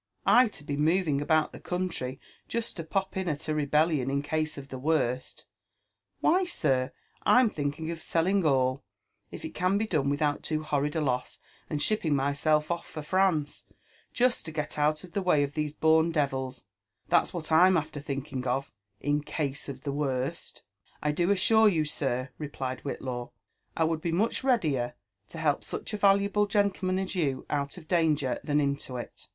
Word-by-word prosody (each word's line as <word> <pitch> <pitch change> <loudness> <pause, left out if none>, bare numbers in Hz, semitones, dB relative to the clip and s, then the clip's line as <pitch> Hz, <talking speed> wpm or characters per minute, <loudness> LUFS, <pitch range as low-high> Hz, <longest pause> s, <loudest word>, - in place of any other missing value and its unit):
I 250 0 +6
to 210 - -10
be 145 -1 -3
moving 155 -1 +2
about 155 +1 +2
the - - -9
eountry 175 -8 -2 0.3
just 230 0 -3
to 165 - -5
pop 190 +4 -2
in 190 -2 -1
at 150 +1 -3
a 155 - 0
rebellion 150 -2 +2
in 140 +1 0
case 155 +1 -1
of 140 -1 -9
the 130 - -6
worst! 130 -4 -1 0.8
Why, 370 +4 +4
sir, 130 - 0 0.3
I'm 250 -3 +5
thinking 150 +2 -3
of 165 -1 -6
selling 185 +5 +1
all, 130 -2 +2 0.5
if - - -8
it 320 - -6
can 185 +2 +1
be 220 - 0
done 150 -9 0
without 145 0 0
loo 155 -1 -1
horrid 145 0 -1
a 160 - +1
loss^ 125 -3 -1 0.3
lind 150 -2 -1
shipping 170 -9 +2
myself 145 +3 +1
off 170 - -3
for 155 - -7
France, 175 -3 +1 0.5
just 245 -6 +1
td 160 - -7
get 150 -1 -3
out 155 +2 +2
of 180 - -12
the 200 - -1
way 165 -6 +3
of 140 0 -3
these 150 -1 -1
born 160 +1 +4
devils, 135 -4 -2 0.2
— - - -42
that's - - +3
what 165 -3 -5
I'm 180 +3 +6
after 155 -1 -3
thinking 135 -2 -4
of 135 +3 -1 0.3
in 145 +1 +1
case 145 -1 -3
of 135 -1 -8
the 140 - -2
wonL" 140 +1 -3 0.2
" - - -21
I 150 - +2
do 175 +4 0
assure 220 +2 +5
you, 160 -5 +1
sir, 135 -3 -1
replied 130 -4 -4
Whitlaw, 125 -3 -4 0.2
'* - - -29
I 165 - +3
would 160 0 0
be 170 - -1
much 210 +9 0
readier 150 - +1 0.3
to - - -10
help 155 -3 +1
tuch - - -5
a - - -1
valuable 200 +1 +3
gentleman 195 -2 +1
as 190 0 -2
you 140 -8 -1
out 140 +1 -1
of 160 -3 -12
danger 155 -7 +1
than 145 0 +1
into 140 -3 -1
it. 120 - -8
155 Hz, 190 wpm, -28 LUFS, 140-180 Hz, 0.8 s, I